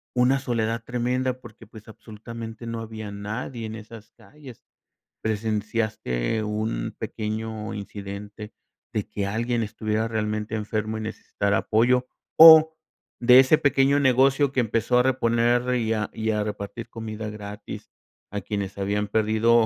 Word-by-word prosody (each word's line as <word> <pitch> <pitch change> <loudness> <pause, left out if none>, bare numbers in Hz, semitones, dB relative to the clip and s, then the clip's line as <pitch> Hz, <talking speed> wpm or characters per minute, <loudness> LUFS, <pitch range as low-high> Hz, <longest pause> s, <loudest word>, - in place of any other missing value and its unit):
una 125 +2 +3
soledad 115 -3 -2
tremenda 125 +1 -1
porque 120 -4 -14
pues, 110 0 -14
absolutamente, 115 +1 -9
no 115 0 -4
había 110 -2 -7
nadie 110 +4 -5
en 110 - -6
esas 110 0 -12
calles, 125 +2 -15 0.6
¿presenciaste 110 - -1
un 105 - -3
pequeño 110 0 -4
incidente, 100 +1 -8 0.4
de 105 - -2
que 105 -2 -3
alguien 115 +3 -1
estuviera 110 +1 -2
realmente 110 0 -2
enfermo 110 0 -2
y - - -5
necesitara 100 -2 -2
apoyo?, 125 +3 +2 0.3
o 160 0 +10 0.5
de 125 +1 +8
ese 135 +4 +4
pequeño 140 0 +3
negocio 135 +1 +3
que 130 - +2
empezó 115 +1 +1
a - - +4
reponer 120 -1 +2
y 115 -2 0
a 110 -1 -1
y 110 0 -2
a 105 - 0
repartir 105 +2 -6
comida 110 -2 -6
gratis, 105 0 -9 0.4
a 105 - -3
quienes 100 -2 -4
habían 100 +1 -1
perdido, 110 +2 +3
110 Hz, 135 wpm, -25 LUFS, 105-120 Hz, 0.6 s, o